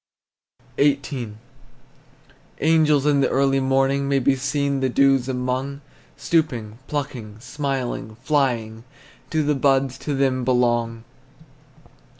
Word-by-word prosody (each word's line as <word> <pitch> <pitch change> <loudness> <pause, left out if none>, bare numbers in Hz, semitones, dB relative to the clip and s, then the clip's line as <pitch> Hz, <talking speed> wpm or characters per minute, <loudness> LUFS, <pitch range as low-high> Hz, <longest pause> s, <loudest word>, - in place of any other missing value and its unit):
XVIII. 140 -6 0 1.2
Angels 155 -2 +3
in 145 -2 +3
the 135 - +2
early 135 0 +2
morning 135 +1 +1
May 140 - +2
be 135 +1 +2
seen 140 +1 -1
the 130 -1 0
dews 135 0 +3
among, 130 +2 -2 0.4
Stooping, 135 -8 -1
plucking, 125 -8 -5
smiling, 130 -4 -4
flying: 120 -4 -1 0.5
Do 155 -1 0
the 150 +1 +1
buds 135 -1 +1
to 145 - -3
them 130 -2 +1
belong? 120 -2 +1
135 Hz, 110 wpm, -22 LUFS, 125-140 Hz, 1.2 s, Angels